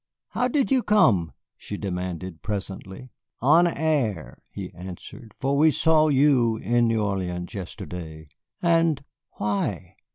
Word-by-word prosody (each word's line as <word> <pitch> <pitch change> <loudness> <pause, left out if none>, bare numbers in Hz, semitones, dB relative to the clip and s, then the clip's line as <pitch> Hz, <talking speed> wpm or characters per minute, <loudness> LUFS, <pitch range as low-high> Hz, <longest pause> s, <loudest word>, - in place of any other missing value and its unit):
"How 250 - 0
did 270 +1 0
you 260 -2 +4
come?" 110 - +3 0.3
she 105 - -6
demanded 90 -3 -5
presently. 100 +3 -5 0.3
"On 160 +7 +5
air," 145 - -1
he - - -7
answered, 95 +4 -10
"for 135 +2 0
we 155 +3 +5
saw 155 0 +3
you 135 -6 +3
in 120 +3 +2
New 115 -2 +1
Orleans 90 -3 -3
yesterday." 85 -4 -7 0.4
"And 165 -4 +2 0.3
why?" 100 -3 -2
110 Hz, 125 wpm, -25 LUFS, 95-150 Hz, 0.4 s, On